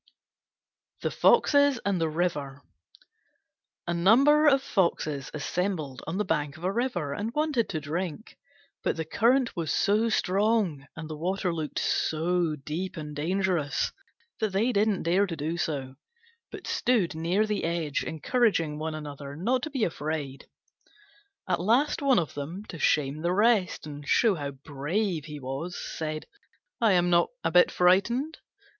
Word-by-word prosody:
THE - - 0
FOXES 285 -3 +4
AND 195 -4 0
THE 160 - +1
RIVER 150 -5 -2 1.2
A 170 - -1
number 270 - +5
of 275 -2 +4
Foxes 155 - 0
assembled 155 -3 -3
on 165 +3 -3
the 210 - 0
bank 145 -1 -1
of 165 - -14
a 185 - +1
river 195 - -1
and 210 +8 -3
wanted 300 -6 +1
to 160 - -2
drink; 165 +6 -5 0.5
but - - 0
the 160 - -2
current 240 - +2
was 165 -4 -2
so 215 +3 +2
strong 195 -8 +1
and 165 -2 -7
the 155 - -6
water 180 +3 -1
looked 155 -3 -4
so 165 0 0
deep 155 +6 -5
and 150 -1 -6
dangerous 170 -1 0 0.5
that 215 -3 -1
they 220 +6 +2
didn't 210 -2 +1
dare 185 +4 +2
to 170 - -4
do 155 +2 -3
so, 140 -6 -3 0.6
but - - -9
stood 225 -9 +1
near 170 +7 +1
the 210 -2 -2
edge 165 -4 -1
encouraging 165 - 0
one 155 0 -3
another 145 -2 -7
not 240 - 0
to 310 - -4
be 270 -6 -2
afraid. 150 -6 -3 1.0
At 180 -2 0
last 240 +12 +2
one 275 -3 +4
of 165 -5 0
them, 165 +8 -6
to 165 - -7
shame 145 +1 +1
the 170 +2 0
rest, 210 -4 +2
and 145 -1 -9
show 225 -4 +4
how 145 -5 -4
brave 150 +5 -3
he 150 -2 -7
was, 135 +7 -5
said, 155 -1 -5 0.6
"I 220 -4 +5
am 175 -1 +3
not 170 0 +4
a - - 0
bit 180 +1 +6
frightened! 235 - +2
175 Hz, 155 wpm, -27 LUFS, 150-210 Hz, 1.2 s, bit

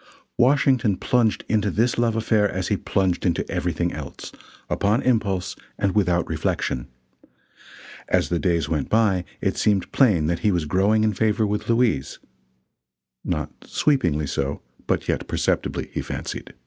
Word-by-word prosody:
Washington 125 -5 +3
plunged 120 -4 +1
into 105 -2 +1
this 115 +6 +1
love 115 -2 +2
affair 110 -2 +2
as 95 -1 -3
he 105 - +2
plunged 95 -2 0
into 85 - 0
everything 85 0 -1
else 70 -3 -8 0.4
upon 105 +4 +1
impulse 105 -7 0 0.2
and 100 -2 0
without 90 -4 +1
reflection. 75 -5 -2 1.2
As - - +2
the 85 - 0
days 85 -4 +1
went 75 -3 -2
by 100 -5 +2 0.2
it - - -1
seemed 100 -3 +1
plain 100 - +3
that 85 +1 0
he 105 - +2
was 85 -4 0
growing 100 +7 +2
in 110 -1 +2
favor 110 +1 +1
with 105 +2 -3
Louise, 115 - +1 1.1
not - - -2
sweepingly 85 - +1
so, 70 0 -3 0.2
but - - 0
yet - - -1
perceptibly, - - -1
he - - -2
fancied. - - -6
100 Hz, 150 wpm, -23 LUFS, 85-110 Hz, 1.2 s, Washington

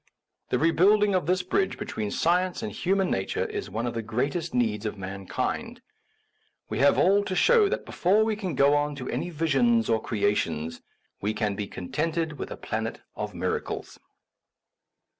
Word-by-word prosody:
The - - +2
rebuilding 195 +6 +4
of 180 -5 +1
this 185 +1 +2
bridge 190 +1 0
between 105 -1 -4
science 180 - +1
and 220 - -3
human 190 +1 0
na 95 - +1
ture - - -1
is - - -5
one 110 +5 -3
of 120 - -2
the 115 - -2
greatest 140 +10 -2
needs 110 -4 0
of 105 -1 -3
man 95 0 -7
kind. - - -3 0.9
We 110 - -2
have 140 +2 +5
all 200 +3 +4
to 190 - -3
show 450 - +5
that 485 +4 -2
before 200 +5 +2
we 220 -1 0
go 150 -9 +2
on 145 0 +1
to 130 -2 -6
any - - -2
visions 135 -9 +2
or 110 - +2
creations 85 -7 -1 0.4
we 105 +2 -1
can 105 -2 0
be 100 0 -4
contented 155 - -2
with - - -4
a - - -7
planet - - -3 0.2
of - - -5
miracles. - - -3
145 Hz, 175 wpm, -27 LUFS, 110-185 Hz, 0.9 s, have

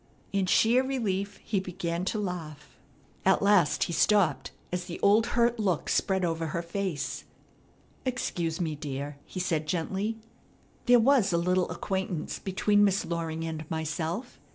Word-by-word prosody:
In 195 -2 +1
sheer 235 +7 +4
relief 205 -7 -2
he 205 - 0
began 180 -1 -3
to 215 - -1
laugh. 170 -7 -5 0.5
At - - +3
last 200 -7 +4
he 170 - -3
stopped, 190 -6 +3 0.2
as 180 0 -2
the 175 -2 -7
old 215 +3 +5
hurt 235 0 +3
look 185 -7 0
spread 190 -2 +1
over 165 -1 -1
her 170 +2 -3
face. 170 -4 -3 0.8
"Excuse 175 -10 -2
me, 165 -3 -1
dear," 145 -1 -5
he 185 - -6
said 160 -4 -1
gently, 190 +7 -1 0.7
"There 245 0 +7
was 235 -4 +4
a 170 - +2
little 180 +1 +1
acquaintance 190 -4 -3
between 205 +2 +2
Miss 200 -1 +2
Loring 165 -1 -3
and 160 -1 -5
myself. 160 - -3
180 Hz, 150 wpm, -28 LUFS, 165-205 Hz, 0.8 s, There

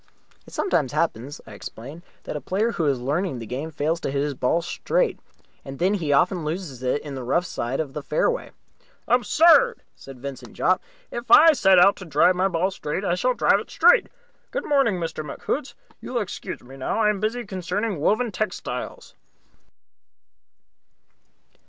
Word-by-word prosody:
"It - - -14
sometimes 145 - 0
happens," 145 -3 -2
I 110 - -13
explained, 135 +10 -9 0.2
"that - - -6
a 150 - -4
player 205 - 0
who 170 - -2
is 135 -3 +1
learning 145 +4 -1
the 115 - -7
game 130 +8 -5
fails 155 +2 -1
to - - -3
hit 140 +1 -1
his 145 -1 -2
ball 135 +6 0
straight, - - -1 0.4
and 135 0 -8
then 185 +6 +2
he 165 -8 -1
often 175 +5 +2
loses 155 -5 -5
it 130 +3 -1
in 145 - -7
the 130 -2 -5
rough 155 +8 +1
at - - -11
the - - -8
side 125 +3 -3
of 145 -4 -3
the 150 - -4
fairway." - - -1 0.6
"Absurd!" 330 - +4
said 135 -2 -12
Vincent 130 -3 -8
Jopp. 185 +1 +2 0.3
"If 240 0 -6
I 325 0 +8
set 195 -9 +4
out 190 +3 +6
to 190 - -9
drive 160 +3 +4
my 185 +2 +2
ball 185 +1 0
straight, 185 +2 -4
I 175 - +1
shall 250 +8 +1
drive - - +3
it - - -9
straight. 480 +1 +4 0.4
Good - - -4
morning, 275 -8 +2
Mr. 165 -3 -4
McHoots. 150 - -4 0.3
You - - -8
will - - +1
excuse - - -7
me 135 +2 -12
now. 135 +11 -2
I 210 -1 +4
am 205 - -4
busy 225 +3 -2
cornering 190 0 -3
Woven 215 +9 +1
Textiles." 215 +2 -5
170 Hz, 185 wpm, -24 LUFS, 140-210 Hz, 0.6 s, I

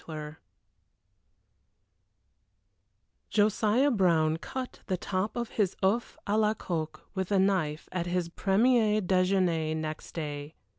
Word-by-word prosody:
III 155 -1 -6 2.9
Josiah 215 +5 +3
Brown 165 -7 +3
cut 255 +9 -6
the 185 - 0
top 190 +5 -2
off 235 -1 -2
his 200 -4 0
oeuf 215 +5 +1
à 210 +2 +1
la 215 0 +2
coque 155 -5 -4
with 190 0 -3
a 200 - +4
knife 185 -6 +1
at 180 -1 -2
his 175 -1 0
premier 215 +4 +3
déjeuner 180 -4 +1
next 155 0 -5
day. 150 -1 -5
185 Hz, 115 wpm, -29 LUFS, 160-210 Hz, 2.9 s, a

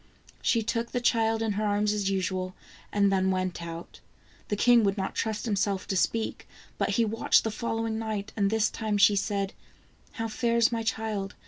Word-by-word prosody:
She 230 -2 +2
took 235 +1 -2
the 245 - +1
child 225 -2 +2
in 220 - 0
her 205 +1 -1
arms 210 0 +1
as 205 -2 0
usual, 185 -1 -2 0.4
and 200 -1 +3
then 190 -1 +2
went 185 -2 -1
out. 170 0 -8 0.5
The 205 - -1
king 235 +2 +5
would 200 0 +1
not 190 -1 -2
trust 220 0 -2
himself 200 -3 0
to 195 - 0
speak, 220 +4 -1 0.3
but - - +1
he 230 - +4
watched 225 +1 +3
the 225 - -1
following 225 0 -2
night, 215 -2 -4
and 200 -2 +2
this 220 +1 +1
time 215 -2 -1
she 205 0 +6
said: 200 -1 -1 0.3
" - - -32
How 225 - -3
fares 235 +1 +2
my 230 -1 -1
child 220 -3 -2
210 Hz, 195 wpm, -28 LUFS, 195-225 Hz, 0.5 s, she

